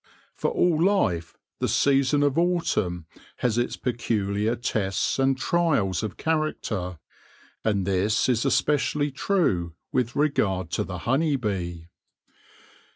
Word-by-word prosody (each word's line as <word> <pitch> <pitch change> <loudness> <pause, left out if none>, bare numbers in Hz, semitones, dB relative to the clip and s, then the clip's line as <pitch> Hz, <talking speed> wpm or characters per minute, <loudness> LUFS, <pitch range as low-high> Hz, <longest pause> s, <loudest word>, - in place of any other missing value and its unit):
For - - -1
all 165 -2 +2
life 90 - +1 0.2
the - - 0
season 140 +1 +3
of 145 -2 +2
autumn 165 - 0 0.3
has 120 -2 0
its 120 - -1
peculiar 110 -2 -1
tests 110 -2 -1
and 135 0 +2
trials 135 - +1
of 105 -3 -5
character; 115 - -2 0.7
and 100 -4 +1
this 100 +3 +1
is 120 -3 +2
especially 145 0 +1
true 115 - 0 0.2
with 120 -2 0
regard 95 - 0
to - - 0
the 90 - -6
honey 145 +4 +2
bee. 90 -8 -3
120 Hz, 120 wpm, -25 LUFS, 95-145 Hz, 0.7 s, season